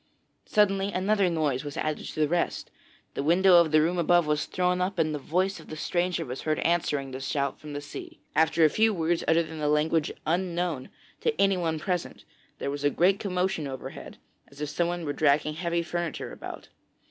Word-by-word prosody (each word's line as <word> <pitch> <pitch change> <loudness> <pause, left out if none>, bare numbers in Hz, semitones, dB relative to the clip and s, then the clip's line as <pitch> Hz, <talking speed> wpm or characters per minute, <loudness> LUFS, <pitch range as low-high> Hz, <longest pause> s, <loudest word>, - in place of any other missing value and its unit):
Suddenly 200 -1 +2
another 195 0 +2
noise 150 -6 0
was 145 -1 -6
added 155 -1 -2
to - - -6
the 155 - +3
rest. 175 +3 -1 0.4
The - - -2
window 175 +4 +5
of 170 -2 +5
the 155 0 +5
room 175 +2 0
above 175 0 +4
was 150 0 0
thrown 180 0 0
up, 185 +1 -1
and 155 -2 +1
the 150 - -3
voice 185 +7 0
of - - -14
the 155 - -6
stranger 175 +2 -1
was 125 +1 -6
heard 155 -1 0
answering 150 -5 0
the 130 - -5
shout 140 0 -2
from 150 -1 -9
the 145 - -4
sea. 145 - -9 0.2
After 160 +1 +4
a - - +5
few 220 -1 +3
words 165 0 0
uttered 165 +1 +3
in 160 0 -8
a 150 - +1
language 150 +1 +2
unknown 175 -4 -1 0.3
to 460 - -1
anyone 180 -5 +2
present, 180 +2 -3 0.3
there 140 - -3
was 145 0 -5
a 145 - +4
great 185 +6 +3
commotion 180 -5 -1
overhead, 130 -2 -8 0.3
as 140 - -17
if 150 -1 -3
someone 175 +1 -1
were 145 - -2
dragging 150 +1 +2
heavy 170 +1 -1
furniture 175 -1 -4
about. - - -9
165 Hz, 200 wpm, -27 LUFS, 150-180 Hz, 0.4 s, window